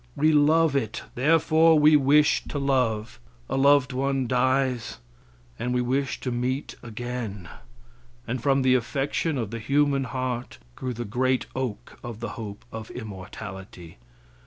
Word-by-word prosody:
We 155 Hz, +2 st, +3 dB
love 150 Hz, +1 st, +4 dB
it; 110 Hz, -6 st, -2 dB
therefore 160 Hz, +3 st, +4 dB
we 150 Hz, +1 st, +6 dB
wish 145 Hz, +1 st, +4 dB
to -, -, -5 dB
love. 125 Hz, -, 0 dB, 0.3 s
A -, -, -2 dB
loved 140 Hz, -1 st, +4 dB
ones 135 Hz, -1 st, -1 dB
dies, 130 Hz, -1 st, +1 dB, 0.6 s
and 125 Hz, +1 st, -1 dB
we 125 Hz, -, +2 dB
wish 130 Hz, +2 st, -1 dB
to 125 Hz, -, -2 dB
meet 125 Hz, +3 st, -2 dB
again, 115 Hz, -5 st, -6 dB, 0.8 s
and 125 Hz, +1 st, -3 dB
from 135 Hz, +1 st, +2 dB
the 130 Hz, -1 st, +4 dB
affection 140 Hz, +5 st, 0 dB
of 115 Hz, -4 st, -3 dB
the 115 Hz, -, -4 dB
human 140 Hz, +2 st, +1 dB
heart 130 Hz, -1 st, -4 dB, 0.2 s
grew 130 Hz, -1 st, -4 dB
the 120 Hz, +1 st, -4 dB
great 130 Hz, +4 st, 0 dB
oak 125 Hz, -6 st, -5 dB
of 120 Hz, -3 st, -7 dB
the 115 Hz, -, -4 dB
hope 105 Hz, -3 st, -8 dB
of 110 Hz, -1 st, -7 dB
immortality. 95 Hz, -, -9 dB
130 Hz, 145 wpm, -25 LUFS, 115-140 Hz, 0.8 s, we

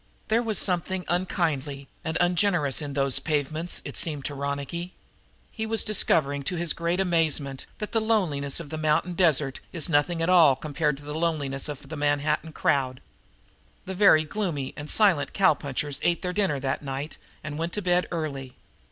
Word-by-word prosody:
There 225 Hz, +2 st, +3 dB
was 225 Hz, -3 st, -1 dB
something 180 Hz, 0 st, +1 dB
unkindly 155 Hz, -6 st, -1 dB, 0.2 s
and 160 Hz, 0 st, -1 dB
ungenerous 175 Hz, -5 st, +2 dB
in 145 Hz, -2 st, -5 dB
those 135 Hz, -1 st, +1 dB
pavements, 155 Hz, +3 st, -1 dB
it -, -, -7 dB
seemed 150 Hz, -4 st, -2 dB
to 145 Hz, -, -2 dB
Ronicky. 140 Hz, +5 st, -4 dB, 0.6 s
He 220 Hz, -1 st, -4 dB
was 225 Hz, 0 st, +2 dB
discovering 145 Hz, -9 st, +2 dB
to 185 Hz, -, -1 dB
his 170 Hz, -1 st, 0 dB
great 170 Hz, +2 st, -1 dB
amazement 160 Hz, -7 st, 0 dB
that 210 Hz, -, -5 dB
the 225 Hz, -, +1 dB
loneliness 175 Hz, -12 st, 0 dB
of 150 Hz, -4 st, -9 dB
the 155 Hz, -, -4 dB
mountain 155 Hz, +3 st, +1 dB
desert 150 Hz, -7 st, +2 dB
is 170 Hz, 0 st, -1 dB
nothing 165 Hz, +3 st, +2 dB
at -, -, +1 dB
all 165 Hz, -7 st, +6 dB
compared 150 Hz, 0 st, -1 dB
to 145 Hz, -, -13 dB
the 150 Hz, +1 st, -6 dB
loneliness 150 Hz, -4 st, -1 dB
of 145 Hz, -2 st, -7 dB
the 160 Hz, -, -6 dB
Manhattan 150 Hz, +2 st, 0 dB
crowd. 130 Hz, -4 st, 0 dB, 0.9 s
Two 190 Hz, -, -5 dB
very 185 Hz, -5 st, +6 dB
gloomy 155 Hz, -6 st, -3 dB
and 145 Hz, +1 st, -7 dB
silent 195 Hz, -9 st, +3 dB
cow 190 Hz, -4 st, +5 dB
punchers 145 Hz, 0 st, -3 dB
ate 175 Hz, +1 st, +1 dB
their 180 Hz, 0 st, -2 dB
dinner 185 Hz, -8 st, +1 dB
that 135 Hz, 0 st, -2 dB
night 140 Hz, +2 st, -5 dB, 0.2 s
and 155 Hz, 0 st, -5 dB
went 165 Hz, +1 st, -2 dB
to 210 Hz, -, -2 dB
bed 180 Hz, 0 st, +2 dB
early. 140 Hz, -6 st, -4 dB
155 Hz, 180 wpm, -26 LUFS, 140-180 Hz, 0.9 s, all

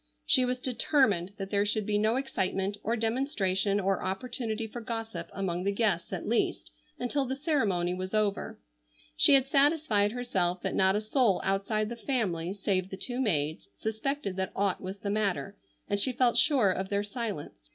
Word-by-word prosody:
She 255 Hz, -, +5 dB
was 250 Hz, 0 st, -1 dB
determined 235 Hz, -, +1 dB
that 195 Hz, -1 st, -6 dB
there 200 Hz, -1 st, +3 dB
should 210 Hz, 0 st, -1 dB
be 205 Hz, 0 st, +1 dB
no 220 Hz, +2 st, +2 dB
excitement 195 Hz, -7 st, -1 dB
or 230 Hz, -, 0 dB
demonstration 215 Hz, -5 st, 0 dB
or 195 Hz, -1 st, 0 dB
opportunity 225 Hz, +3 st, -3 dB
for 235 Hz, +2 st, -7 dB
gossip 225 Hz, 0 st, -5 dB
among 180 Hz, -2 st, -3 dB
the 200 Hz, -, +1 dB
guests 200 Hz, -5 st, 0 dB
at 185 Hz, -3 st, -4 dB
least 235 Hz, -, 0 dB, 0.3 s
until 270 Hz, +3 st, -1 dB
the 265 Hz, +1 st, -3 dB
ceremony 215 Hz, -, 0 dB
was 185 Hz, +1 st, -5 dB
over. 210 Hz, -2 st, -1 dB, 0.6 s
She 275 Hz, -, +7 dB
had 265 Hz, -1 st, +4 dB
satisfied 275 Hz, -7 st, +3 dB
herself 185 Hz, -8 st, -1 dB
that -, -, -1 dB
not 190 Hz, +1 st, +3 dB
a 210 Hz, -, 0 dB
soul 220 Hz, -2 st, +2 dB
outside 200 Hz, +2 st, 0 dB
the 235 Hz, -, -5 dB
family 200 Hz, -10 st, -1 dB
save 190 Hz, -2 st, -1 dB
the 190 Hz, -, -7 dB
two 245 Hz, +5 st, -2 dB
maids 150 Hz, -, 0 dB
suspected 220 Hz, -, -3 dB
that 190 Hz, 0 st, -2 dB
aught 200 Hz, -2 st, 0 dB
was 190 Hz, +1 st, -6 dB
the 200 Hz, 0 st, -3 dB
matter, 200 Hz, -1 st, -1 dB, 0.3 s
and 205 Hz, -, 0 dB
she 255 Hz, +5 st, +2 dB
felt 245 Hz, -1 st, +2 dB
sure 240 Hz, -4 st, +4 dB
of 190 Hz, +1 st, -3 dB
their 200 Hz, 0 st, 0 dB
silence. 200 Hz, -, -6 dB
210 Hz, 180 wpm, -29 LUFS, 190-240 Hz, 0.6 s, She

